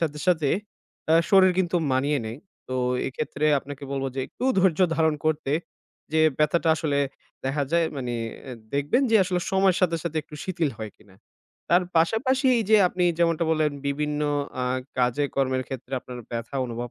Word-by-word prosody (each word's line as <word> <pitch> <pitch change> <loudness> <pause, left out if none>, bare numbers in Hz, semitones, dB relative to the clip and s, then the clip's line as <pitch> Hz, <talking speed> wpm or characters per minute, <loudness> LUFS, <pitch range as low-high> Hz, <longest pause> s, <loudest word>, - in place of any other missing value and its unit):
সাথে, 150 -3 -1
সাথে 165 -5 +3 0.6
আ - - +7 0.2
শরীর 190 -2 +6
কিন্তু 175 -1 +1 0.2
মানিয়ে 140 +3 +1
নেয়। 115 +4 -6 0.3
তো 130 - -3 0.3
এক্ষেত্রে 145 +2 -3
আপনাকে 140 +1 -10
বলব 135 -1 -2
যে 135 - -2
একটু - - -7
ধৈর্য 185 -2 +3 0.2
ধারণ 160 -1 +3
করতে। 150 -3 0 0.6
যে 160 - +3 0.2
ব্যথাটা 155 +2 +2
আসলে 145 -2 0 0.5
দেখা 140 +2 0
যায় 170 -1 +3
মানি 125 -3 -3 0.6
দেখবেন 145 - +2
যে 225 - +6
আসলে 180 -1 -1
সময়ের 190 -1 +3
সাথে, 170 -2 +2
সাথে 165 -2 -4
একটু 150 0 -14
শিথিল 170 -5 -1
হয় 110 -1 -5
কিনা। 100 -3 -21 0.6
তার 175 +2 +5
পাশাপাশি 255 - +2
এইযে 215 0 +4
আপনি 180 0 -1
যেমনটা 165 -1 +2
বললেন 155 -2 +2
বিভিন্ন 150 +1 -1 0.4
আ - - 0 0.3
কাজে 125 +3 +2
কর্মের 130 -1 +1
ক্ষেত্রে 130 0 -7
আপনার 125 0 -9
ব্যথা 115 +3 -4
অনুভব 120 0 -5
150 Hz, 165 wpm, -25 LUFS, 135-175 Hz, 0.6 s, আ